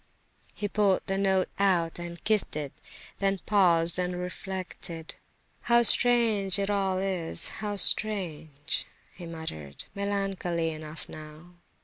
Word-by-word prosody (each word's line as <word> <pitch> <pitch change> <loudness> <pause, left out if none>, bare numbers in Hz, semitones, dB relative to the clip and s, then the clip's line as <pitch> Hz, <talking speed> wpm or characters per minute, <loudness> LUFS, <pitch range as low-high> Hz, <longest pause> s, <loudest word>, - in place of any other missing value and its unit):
Ha, - - -39
ha, - - -40
ha!" - - -36
He 205 - -3
pulled 200 -2 +2
the 195 - -2
note 190 -1 +1
out 175 -4 +1
and 170 0 -8
kissed 215 -7 +1
it; 145 -3 -5 0.5
then 195 0 0
paused 175 -4 +3
and 180 0 -1
reflected. 180 -2 -6 0.6
"How 235 0 +5
strange 225 -5 +5
it 200 0 -1
all 195 -2 0
is! 185 -4 -1
how 210 -1 -3
strange!" 165 -8 +2 0.3
he 175 -2 -10
muttered, 120 - -6
melancholy 195 -4 -2
enough 155 0 -9
now. 155 +3 -12
185 Hz, 135 wpm, -27 LUFS, 165-200 Hz, 0.6 s, How